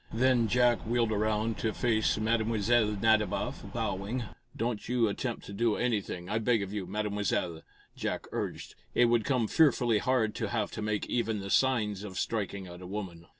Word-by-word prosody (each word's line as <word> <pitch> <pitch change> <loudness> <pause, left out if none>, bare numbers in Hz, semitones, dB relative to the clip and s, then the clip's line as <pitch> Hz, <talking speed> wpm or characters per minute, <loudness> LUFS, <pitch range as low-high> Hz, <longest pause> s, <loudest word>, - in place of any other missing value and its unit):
Then 120 0 +3
Jack 120 +1 +3
wheeled 115 0 0
around 110 +1 0
to 110 -1 -1
face 110 -2 +2
Mlle. 110 +1 +1
Nadiboff, 110 -2 +2
bowing. 100 +6 -2 0.3
"Don't 115 -2 -2
you 120 -2 +3
attempt 115 +4 -3
to 100 - -8
do 115 +1 +1
anything, 105 -7 -2
I 105 +3 0
beg 115 -2 +2
of 100 +1 -6
you, 100 -4 -3
Mademoiselle," 100 -4 -1 0.3
Jack - - -3
urged. - - -4 0.2
"It 120 -1 +5
would 115 -2 +2
come 125 -5 +1
fearfully 120 -8 +3
hard 120 -4 +1
to 110 - -2
have 110 -1 -1
to - - -5
make 105 -1 -1
even 115 -3 -1
the 100 0 -5
signs 110 -7 +2
of 95 -3 -7
striking 100 -3 -2
at 90 0 -10
a 90 - -8
woman." 90 -4 -6
110 Hz, 175 wpm, -30 LUFS, 100-120 Hz, 0.3 s, It